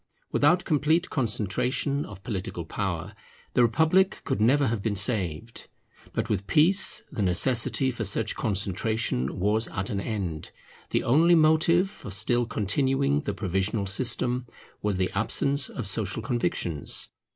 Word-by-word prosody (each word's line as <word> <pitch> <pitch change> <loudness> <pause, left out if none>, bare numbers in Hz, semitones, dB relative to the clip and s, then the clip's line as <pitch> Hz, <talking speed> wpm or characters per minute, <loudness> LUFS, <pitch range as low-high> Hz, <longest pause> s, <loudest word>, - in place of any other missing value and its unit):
Without 175 +5 +3
complete 155 +3 +1
concentration 125 +4 -1
of 100 -2 -12
political 90 -6 -5
power, 95 +1 -4 0.4
the - - +3
republic 160 - +2
could 105 - -2
never 140 +6 +3
have 115 -4 -1
been 105 0 -2
saved. 100 0 -2 0.4
But - - -2
with 100 -1 -2
peace 170 +6 +4
the - - -4
necessity 120 +8 +2
for 120 - -5
such - - 0
concentration 100 - -1
was 105 +4 +2
at 95 +1 -4
an 100 - -2
end. 95 -8 -4 0.4
The - - 0
only 165 +8 +4
motive 160 +3 +4
for 195 - -11
still 115 +4 +1
continuing 135 +7 0
the 150 - -4
provisional 95 +2 -1
system 120 +4 0 0.3
was 105 -2 -1
the 95 0 -1
absence 140 -1 +1
of 125 - -6
social 100 +2 -2
convictions. 90 - -2
115 Hz, 140 wpm, -26 LUFS, 100-140 Hz, 0.4 s, peace